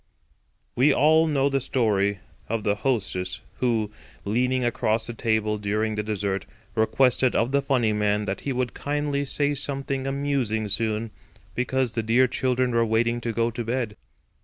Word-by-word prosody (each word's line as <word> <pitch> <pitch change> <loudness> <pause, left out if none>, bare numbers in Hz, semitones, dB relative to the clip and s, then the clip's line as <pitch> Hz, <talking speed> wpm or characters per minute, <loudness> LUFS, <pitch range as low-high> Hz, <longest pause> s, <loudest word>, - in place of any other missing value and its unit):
We 135 +5 +5
all 160 +3 +4
know 140 -3 +2
the 135 -1 +1
story 100 -6 +1 0.3
of 115 -1 -1
the 100 - +2
hostess 100 -6 -2 0.2
who, 115 -4 +1 0.3
leaning 125 +4 +1
across 110 -1 0
the 120 - -5
table 110 -2 0
during 105 +2 -1
the 105 - -1
dessert, 100 -2 -2 0.3
requested 125 +3 +2
of 120 +3 +2
the 140 0 +3
funny 125 -6 +1
man 105 0 +1
that 95 0 -3
he 140 - -2
would 125 -1 -1
kindly 145 -1 -1
say 145 +1 0
something 135 -1 -3
amusing 135 -6 -1
soon, 110 +1 -1 0.4
because 125 0 0
the 115 - -1
dear 120 +4 +3
children 130 0 0
were 115 0 +3
waiting 115 +1 +1
to 115 - -2
go 115 +1 0
to 120 +1 -4
bed. 115 -2 -2
115 Hz, 160 wpm, -25 LUFS, 110-130 Hz, 0.4 s, We